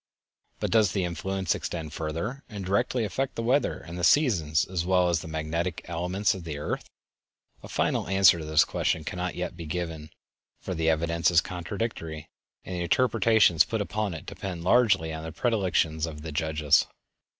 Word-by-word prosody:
But - - -2
does 110 -5 +4
the 95 - 0
influence 95 +2 -1
extend 80 -3 -5
further, 85 - -4
and 100 -4 -6
directly 110 +5 +1
affect 135 +6 -2
the 115 - -3
weather 130 +5 +2
and 85 +1 -8
the - - -4
seasons 85 - +3
as 90 -2 -2
well 90 0 +3
as 85 -2 +1
the - - -8
magnetic 80 +2 -3
elements 90 +4 0
of 95 - -8
the 80 -3 -5
earth? 75 - -4 0.7
A - - -10
final - - 0
answer 95 -2 +5
to 80 - -6
this 80 0 +4
question 80 - -1
cannot 90 +3 -4
yet 90 0 -4
be 85 -2 -8
given, 80 -2 -4 0.5
for 95 - -5
the 80 -1 +1
evidence 85 +1 +2
is 85 -1 +5
contradictory, 90 -3 -4 0.4
and 95 - -6
the 90 - -3
interpretations 110 -2 +4
put 115 - -3
upon 105 -2 -2
it 80 - -9
depend 90 -3 -6
largely 95 -6 +3
on 80 0 -6
the 80 - -6
predilections 90 -9 0
of 75 -2 -8
the 80 - -5
judges. 75 0 +2
85 Hz, 180 wpm, -27 LUFS, 80-100 Hz, 0.7 s, answer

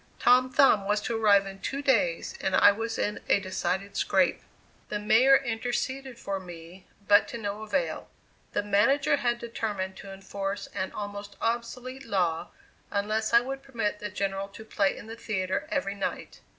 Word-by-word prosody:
Tom 255 +1 +5
Thumb 235 -7 +5
was 210 0 +2
to 230 - -2
arrive 205 -3 +5
in 195 0 -8
two 275 +6 -4
days 205 -11 +1
and 190 - +1
I 205 - +7
was 225 +2 -3
in 210 - -1
a - - +5
decided 190 +1 -3
scrape. - - +2 0.5
The 210 - -1
mayor 245 +6 +5
interceded 255 +1 -3
for 195 -5 -3
me, 175 0 -11 0.2
but 205 0 +6
to 235 - -6
no 205 -1 -4
avail; 220 - -2 0.4
the - - 0
manager 205 +9 +3
had 240 -3 0
determined 210 -5 -4
to 195 - -9
enforce 195 +1 -4
an 190 -1 -3
almost 205 0 -6
obsolete 245 +3 -3
law 175 -8 0 0.4
unless 215 +2 -1
I 235 0 +7
would 270 +2 -5
permit 230 -6 -3
the 210 - -4
General 195 -1 -2
to 210 +2 -12
play 200 -3 +1
in - - -10
his 225 +1 -9
theatre 190 +4 -2
every 275 -10 -1
night. 200 -1 -5
210 Hz, 170 wpm, -28 LUFS, 195-240 Hz, 0.5 s, I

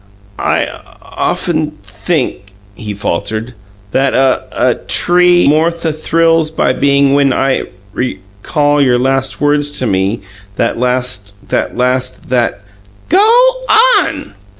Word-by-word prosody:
"'I - - +1 0.4
often 155 -3 -2
think,'" 100 - -3 0.2
he 105 0 -7
faltered, 110 +5 -3 0.4
"'and 135 0 +1
a 130 -1 +2
a - - +1
tree 175 -1 +3
more 155 +3 +3
th 165 -2 -3
thrills 165 0 +1
my 125 - +2
bein' 140 0 +2
when 140 -1 +3
I 135 +1 0 0.3
REcall 125 +7 -1
your 125 -2 +3
last 135 +1 -1
words 145 0 0
to 130 - 0
me 95 +1 -1 0.3
that 115 +1 -1
last 125 -6 -2
that - - -2
last 125 +1 -1
that 120 -5 0 0.2
'" 100 0 -28
"GO 395 +6 +4 0.7
ON!" - - -4
130 Hz, 125 wpm, -13 LUFS, 110-150 Hz, 0.7 s, GO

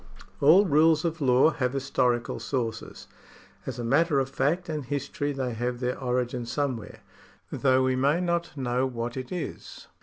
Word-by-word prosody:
All 170 +8 +6
rules 155 0 +4
of 165 -1 -2
law 130 +3 +4
have 125 -4 -2
historical 125 -3 0
sources. 115 -5 -4 0.6
As - - -4
a 120 - -4
matter 145 +5 +2
of 135 0 -1
fact 170 +7 0
and 155 -3 -3
history 145 +2 -3
they 130 -3 -3
have 120 +2 -3
their 125 0 -2
origin 125 -2 -2
somewhere, 125 -4 -3 0.5
though 130 -1 +2
we 130 0 +1
may 140 +6 +2
not 170 -3 -2
know 130 0 0
what 120 -1 -4
it 130 -1 -6
is. 180 -2 -6
135 Hz, 160 wpm, -27 LUFS, 125-150 Hz, 0.6 s, All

